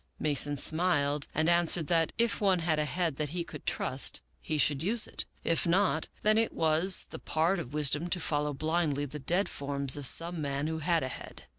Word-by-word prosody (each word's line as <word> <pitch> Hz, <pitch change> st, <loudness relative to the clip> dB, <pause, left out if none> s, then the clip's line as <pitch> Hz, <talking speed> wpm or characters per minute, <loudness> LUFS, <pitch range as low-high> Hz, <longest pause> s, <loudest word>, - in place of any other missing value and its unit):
Mason 145 Hz, -1 st, +1 dB
smiled 150 Hz, -3 st, +1 dB
and 155 Hz, +1 st, -1 dB
answered 170 Hz, -1 st, +2 dB
that 165 Hz, +1 st, 0 dB
if 230 Hz, -1 st, 0 dB
one 195 Hz, -3 st, +2 dB
had 165 Hz, -2 st, -1 dB
a 150 Hz, -, 0 dB
head 165 Hz, -2 st, -3 dB
that 150 Hz, -2 st, -3 dB
he 170 Hz, +3 st, -4 dB
could 150 Hz, -3 st, -12 dB
trust 130 Hz, +1 st, 0 dB, 0.2 s
he 155 Hz, -, -4 dB
should 145 Hz, -1 st, +2 dB
use 215 Hz, +6 st, +4 dB
it; -, -, -6 dB, 0.2 s
if 165 Hz, +1 st, 0 dB
not, 175 Hz, -2 st, 0 dB, 0.2 s
then 215 Hz, +1 st, +3 dB
it 225 Hz, -, -1 dB
was 165 Hz, +3 st, +4 dB
the -, -, -8 dB
part 165 Hz, +4 st, -1 dB
of 145 Hz, -3 st, -8 dB
wisdom 150 Hz, +3 st, +1 dB
to 180 Hz, -, -1 dB
follow 150 Hz, -2 st, -1 dB
blindly 155 Hz, 0 st, -2 dB
the 150 Hz, +2 st, -9 dB
dead 175 Hz, +8 st, -1 dB
forms 140 Hz, -1 st, -1 dB
of 145 Hz, -3 st, -1 dB
some 170 Hz, +3 st, +5 dB
man 140 Hz, 0 st, -3 dB
who 160 Hz, 0 st, -4 dB
had 165 Hz, 0 st, 0 dB
a -, -, -3 dB
head. -, -, -10 dB
160 Hz, 205 wpm, -29 LUFS, 145-175 Hz, 0.2 s, some